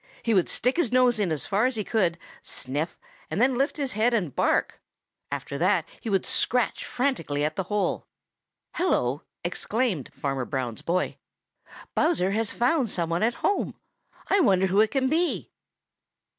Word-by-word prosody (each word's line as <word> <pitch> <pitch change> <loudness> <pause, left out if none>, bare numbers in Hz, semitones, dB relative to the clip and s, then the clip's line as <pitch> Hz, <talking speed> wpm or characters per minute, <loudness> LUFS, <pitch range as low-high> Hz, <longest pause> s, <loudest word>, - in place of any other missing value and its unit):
He 230 - +2
would 185 -4 +3
stick 250 +5 +1
his 345 -10 +1
nose 250 -2 +4
in 195 -5 +1
as 155 - -2
far 210 +5 +2
as 260 - -2
he 215 - -2
could, 185 -6 +1 0.2
sniff, 145 +6 -3 0.3
then 255 +5 +2
lift 270 +5 0
his 275 -3 -1
head 225 +3 +2
and 175 - -1
bark. - - +1 0.5
After 140 - -4
that 175 -1 +3
he 225 - -5
would 195 -2 +1
scratch 250 0 +1
frantically 165 - 0
at 155 0 -2
the 190 - -2
hole. 205 +1 -1 0.7
"Hello!" 145 - +1 0.2
exclaimed 190 - -1
Farmer 135 -3 -2
Brown's 125 -4 -3
boy, 180 +2 -1 0.8
"Bowser 305 - +2
has 220 +1 0
found 250 0 +1
some 170 -3 -1
one 170 - 0
at 235 +2 +2
home! 405 - +1 0.5
I 400 - +3
wonder 190 - +4
who 195 +2 +4
it 220 - +3
can 270 -2 +1
be." 330 +5 0
210 Hz, 165 wpm, -26 LUFS, 170-250 Hz, 0.8 s, nose